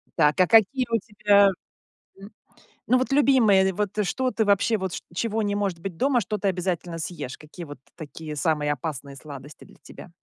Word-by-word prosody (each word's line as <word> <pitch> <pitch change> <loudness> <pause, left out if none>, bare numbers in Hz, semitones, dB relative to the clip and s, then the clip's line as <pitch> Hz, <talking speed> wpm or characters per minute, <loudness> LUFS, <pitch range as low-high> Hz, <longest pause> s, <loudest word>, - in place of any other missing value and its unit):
Так, 150 +1 +2
а 180 - +4
какие 230 +4 +4
у 230 - +2
тебя, 205 -2 +3 0.7
м, 200 +2 -12 0.6
ну, 255 - +4
вот 260 +2 -2
любимые, 225 -9 +4
вот 205 +1 -1 0.2
что 255 +6 -1
ты 220 - 0
вообще, 205 +2 +2
вот 190 -2 -4
чт - - -6
чего 225 +3 -1
не 205 0 -1
может 195 -4 -2
быть 175 -2 -7
дома, 260 -3 +2
что 210 +2 -3
ты 200 - -2
обязательно 180 -2 -2
съешь? 150 -6 -6
Какие 160 +3 -11
вот 145 -3 -11 0.2
такие 155 -1 -8
самые 150 -1 0
опасные 140 -1 -6
сладости 145 0 -11
для - - -19
тебя? - - -13
190 Hz, 190 wpm, -24 LUFS, 155-215 Hz, 0.7 s, а